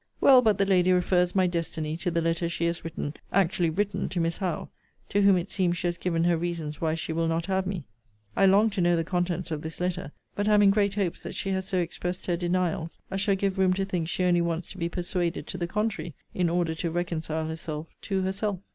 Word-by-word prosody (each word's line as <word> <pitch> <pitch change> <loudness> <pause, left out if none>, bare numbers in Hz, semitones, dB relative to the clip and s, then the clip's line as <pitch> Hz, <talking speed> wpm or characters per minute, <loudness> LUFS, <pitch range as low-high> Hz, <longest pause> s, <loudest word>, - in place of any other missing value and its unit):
Well, 260 -2 +7
but 215 -5 +3
the 195 - +3
lady 185 -2 +4
refers 180 0 +2
my 190 -1 +4
destiny 165 -3 -2
to 175 +1 -1
the 170 -1 0
letter 165 +1 0
she 170 0 -1
has 170 0 -1
written, 160 -3 -4 0.2
actually 185 -2 +2
written, 205 +5 -1
to 180 - -2
Miss 165 0 0
Howe; 180 -5 -3 0.4
to 205 - +2
whom 195 -2 +6
it 175 +3 -3
seems 175 -3 +1
she 175 - -4
has 175 -1 0
given 165 -2 0
her 170 -1 +3
reasons 160 -3 -4
why 160 -1 +1
she 165 0 -3
will 165 0 0
not 165 0 0
have 190 0 0
me. 185 -7 -4 0.5
I 195 - +5
long 205 +3 +5
to 195 - -1
know 175 0 +4
the 165 - +1
contents 175 0 -1
of 155 -2 -2
this 160 +1 -7
letter: 180 -5 -2 0.2
but 205 +1 -1
am 210 -1 +5
in 200 - +7
great 200 -1 +2
hopes 195 -5 -1
that - - -7
she 195 - -2
has 190 0 -1
so 185 - 0
expressed 180 +1 -2
her 175 - +1
denials, 175 -1 -1
as 195 0 -1
shall 200 -1 +2
give 195 0 -1
room 185 -1 +4
to 195 +1 -1
think 180 -4 -2
she 185 - -1
only 175 -1 +3
wants 170 0 -2
to 190 - -9
be 170 0 -1
persuaded 175 -1 -2
to 185 - -6
the 170 - -1
contrary, 185 -6 -2 0.2
in 180 -2 +1
order 170 -1 +1
to 165 +1 -2
reconcile 160 -2 -2
herself 160 -1 -5 0.2
to 195 -2 -1
herself. 195 +1 -1
175 Hz, 245 wpm, -27 LUFS, 165-190 Hz, 0.5 s, Well